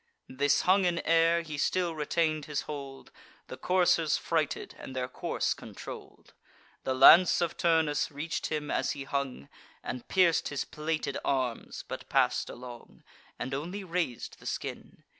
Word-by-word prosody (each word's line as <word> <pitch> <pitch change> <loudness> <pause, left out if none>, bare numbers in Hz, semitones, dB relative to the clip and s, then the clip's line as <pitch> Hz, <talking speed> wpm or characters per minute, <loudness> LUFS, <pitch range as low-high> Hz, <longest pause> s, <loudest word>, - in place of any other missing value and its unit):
Thus 140 +2 +2
hung 190 +1 +4
in 175 -1 +1
air, 165 +1 +4
he 150 -3 -6
still 175 +2 +1
retain'd 155 0 0
his 150 -2 -2
hold, 140 -2 -8 0.4
The - - -6
coursers 175 -3 +2
frighted, 160 -3 -2
and 130 - -9
their 125 -1 -1
course 125 - -1
controll'd. - - -11 0.5
The 130 - 0
lance 165 +7 +8
of 170 -2 -1
Turnus 160 -3 +2
reach'd 150 +3 -3
him 150 -1 -3
as - - 0
he 140 - -6
hung, 135 - -3 0.4
And 125 -1 -6
pierc'd 180 -4 +3
his 145 - -3
plated 155 -2 -3
arms, 130 -4 -2
but - - -7
pass'd - - +2
along, 120 -1 -11 0.3
And 130 - -4
only 175 +9 -4
raz'd 170 -9 -3
the - - -10
skin. - - -6
150 Hz, 150 wpm, -29 LUFS, 135-170 Hz, 0.5 s, lance